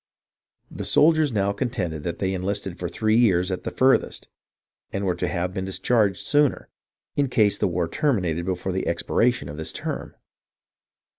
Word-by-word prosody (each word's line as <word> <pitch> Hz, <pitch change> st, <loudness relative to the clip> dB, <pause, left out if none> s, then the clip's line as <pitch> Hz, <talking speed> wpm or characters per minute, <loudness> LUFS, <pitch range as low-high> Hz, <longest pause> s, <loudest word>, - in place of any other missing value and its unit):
The -, -, -6 dB
soldiers 155 Hz, 0 st, +4 dB
now 100 Hz, -2 st, +1 dB
contend 110 Hz, -9 st, -2 dB
that 80 Hz, +2 st, -4 dB
they 95 Hz, 0 st, -1 dB
enlisted 95 Hz, 0 st, -3 dB
for 90 Hz, -, -3 dB
three 110 Hz, +5 st, +1 dB
years 95 Hz, -5 st, +3 dB
at 95 Hz, -, -3 dB
furthest, 130 Hz, +1 st, +2 dB, 0.6 s
and 100 Hz, +1 st, -2 dB
were 90 Hz, -, +1 dB
to -, -, -2 dB
have 90 Hz, 0 st, -2 dB
been 95 Hz, -1 st, -3 dB
dis 95 Hz, -, -4 dB
charged 105 Hz, -6 st, +1 dB
sooner, 145 Hz, -2 st, +2 dB, 0.5 s
in 140 Hz, -2 st, +1 dB
case 105 Hz, -4 st, +2 dB
the -, -, +2 dB
war 85 Hz, -1 st, -1 dB
terminated 90 Hz, -, 0 dB
before 95 Hz, 0 st, -2 dB
the 95 Hz, +1 st, -2 dB
expiration 115 Hz, +2 st, +1 dB
of 75 Hz, +1 st, -7 dB
this 80 Hz, 0 st, -4 dB
term. -, -, -5 dB
95 Hz, 165 wpm, -24 LUFS, 90-120 Hz, 0.6 s, soldiers